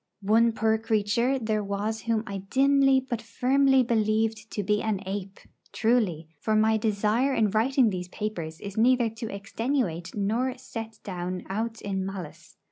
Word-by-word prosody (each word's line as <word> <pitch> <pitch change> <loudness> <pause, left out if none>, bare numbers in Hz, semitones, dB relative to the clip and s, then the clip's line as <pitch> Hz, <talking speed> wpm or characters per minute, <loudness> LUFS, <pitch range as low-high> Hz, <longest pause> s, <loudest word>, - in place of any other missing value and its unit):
One 225 +3 +4
poor 220 0 +1
creature 225 +4 +1
there 215 -3 -1
was 205 +2 -2
whom 225 -2 0
I 200 -3 -5
dimly 270 0 +4
but 245 -4 -4
firmly 265 +3 +3
believed 220 -1 0
to 205 - -3
be 210 +2 +1
an 215 -3 -1
ape; 195 0 -5 0.3
truly, 215 -9 +1
for 215 +6 0
my 220 +1 +4
desire 220 +5 +1
in 215 -3 +2
writing 235 +2 +3
these 180 -1 -4
papers 180 -6 -5
is 200 0 -7
neither 240 0 +3
to 225 0 -6
extenuate 200 - -2
nor 235 +6 0
set 225 -3 -7
down 180 -1 -4
aught 225 +3 -3
in 195 -2 -2
malice. 170 -4 -8
220 Hz, 155 wpm, -27 LUFS, 200-235 Hz, 0.3 s, One